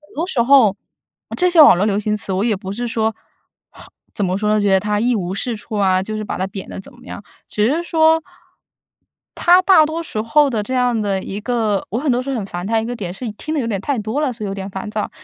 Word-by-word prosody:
多 320 +4 -1
时 270 -10 0
候 255 -3 +6 0.6
呃， - - -5
这 360 - +3
些 335 -3 +7
网 285 - +8
络 200 - +1
流 205 -1 +1
行 210 0 -1
词 195 -2 -5
我 190 +3 0
也 225 -3 +1
不 190 0 -7
是 240 +2 -3
说 220 -1 -1 1.0
怎 205 - 0
么 185 +1 -1
说 210 +1 -1
呢， 215 - +3
觉 205 -1 +1
得 190 0 +4
它 210 0 -1
一 240 +3 +1
无 190 -3 -3
是 235 +3 -3
处 215 +1 -9
啊， 190 -2 +2
就 215 +2 -5
是 215 - -4
把 - - -5
它 190 - -1
贬 195 -1 -8
得 - - -7
怎 - - -12
么 245 +1 -18
样。 205 - -8 0.3
只 210 0 +1
是 330 +4 0
说 320 -1 +3 1.1
它 355 +1 +5
大 365 -5 +6
多 320 +2 -3
时 220 -9 -4
候 285 +5 +3
这 255 - -6
样 245 -2 +1
的 195 -2 -1
一 195 - -5
个 225 -4 -1
我 225 - -1
很 285 -1 0
多 250 +1 +1
时 275 - -5
候 265 - -2
很 200 -3 -4
烦 175 -1 -6
它 225 +1 +1
一 225 - -4
个 245 0 -4
点 180 -5 -5
是 225 +3 -6
听 310 +9 -6
得 295 - 0
有 235 - -2
点 215 -4 -2
太 275 +2 -2
多 220 +7 -2
了， 275 -5 0
所 220 -2 -7
以 - - -3
有 195 - -4
点 195 0 -6
烦 190 +2 -6
躁。 210 -1 -3
220 Hz, 295 characters per minute, -19 LUFS, 200-260 Hz, 1.1 s, 网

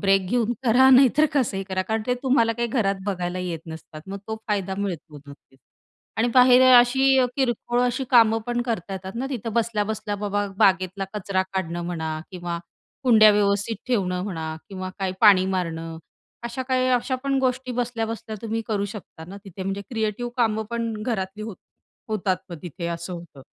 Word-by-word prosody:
Break 195 -1 +3
घेऊन 240 0 +1
करा 250 +3 +6
नाही 265 0 +8
तर 310 - +6
कसंही 240 -9 0
करा 185 -1 -2
कारण 220 +3 -2
ते 250 - +2
तुम्हाला 255 -4 +3
काही 235 +1 -2
घरात 215 -5 +1
बघायला 180 -2 -2
येत 175 -3 -4
नसतात. 160 -1 -9
मग 195 +1 -6
तो 220 - -3
फायदा 195 -2 -1
मिळतो 170 -6 -5
नक्कीच. 140 -1 -16 0.6
आणि 230 +2 +2
बाहेर 250 0 +7
अ, 245 - +10
अशी 265 +2 +4
अ, 255 - +4
किरकोळ 240 -2 0
अशी 250 +2 0
कामं 225 -3 +6
पण 240 0 -1
करता 220 -6 -3
येतात 190 0 -6
ना 255 +3 -2
तिथं 230 -4 -4
बसल्या-बसल्या, 215 -2 -1
बाबा 205 0 -1
बागेतला 190 0 +2
कचरा 195 -2 0
काढणं 175 -2 -2
म्हणा 160 -3 -3
किंवा 175 -2 -4 0.5
कुंड्या 220 -4 +7
व्यवस्थित 205 +1 +1
ठेवणं 185 -7 0
म्हणा 165 -6 -4 0.2
किंवा 185 -2 -6
काय 190 -1 -1
पाणी 200 -4 +7
मारणं 165 -3 -3 0.5
अशा 235 +2 -3
काही 255 0 +2
अशा 250 +1 +1
पण 275 -1 +1
गोष्टी 255 0 -1
बसल्या-बसल्या 230 -2 -3
तुम्ही 225 0 -2
करू 205 -2 0
शकता 175 -5 -10
ना 195 - -8
तिथे 195 -1 -8
म्हणजे 195 +1 -3
क्रिएटिव्ह 225 +1 -2
कामं 220 -3 +1
पण 230 -1 -2
घरातली 215 -3 -3
होत 215 -3 -7 0.5
होतात 200 -3 0
मग 170 - -6
तिथे 170 0 -6
असं 170 +1 -4
होतं 170 -6 -10
210 Hz, 180 wpm, -24 LUFS, 185-240 Hz, 0.6 s, अ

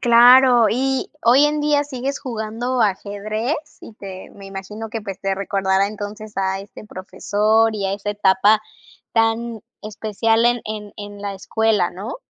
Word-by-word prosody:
Claro, 245 0 +7
y 265 +2 -1
hoy 250 +5 +6
en 300 0 +1
día 295 -1 +2
sigues 275 0 -4
jugando 240 +1 -3
ajedrez 215 +4 -1 0.3
y - - -11
te 190 -3 -9
me 200 -1 -13
imagino 195 +3 -7
que, 225 +1 -5
pues, 195 -2 -7
te 195 0 -1
recordará, 195 0 0
entonces, 210 +1 -7
a 190 0 0
este 200 +2 -12
profesor 210 +3 0
y 205 -2 -3
a 195 - -1
esa 205 +1 -3
etapa 205 +1 +3 0.5
tan 225 0 0 0.2
especial 220 +2 0
en 240 0 +2
en 210 -1 -6
en 205 -1 -9
la 200 -1 -4
escuela, 210 -1 0
¿no? 200 +7 -7
215 Hz, 155 wpm, -20 LUFS, 200-235 Hz, 0.5 s, Claro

